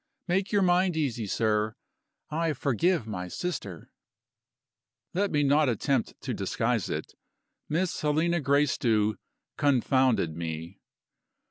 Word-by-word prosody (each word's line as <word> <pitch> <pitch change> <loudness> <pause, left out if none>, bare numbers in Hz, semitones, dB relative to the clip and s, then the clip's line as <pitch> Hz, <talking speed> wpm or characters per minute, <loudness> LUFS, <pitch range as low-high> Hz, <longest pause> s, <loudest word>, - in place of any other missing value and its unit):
Make 190 +2 0
your 205 -2 +3
mind 180 -1 +3
easy, 120 -8 -1
sir, 105 +1 0 0.6
I 160 0 0
forgive 145 - +1
my 90 -5 -5
sister." 100 - -5 1.2
Let 200 +3 +1
me 150 -1 +1
not 145 0 +4
attempt 125 +2 -1
to - - -3
disguise - - -1
it - - -4 0.6
Miss 170 +3 -1
Helena 160 +3 +1
Gracedieu 130 -7 +2 0.4
confounded 130 - +2
me. 85 +2 -6
140 Hz, 110 wpm, -28 LUFS, 110-165 Hz, 1.2 s, not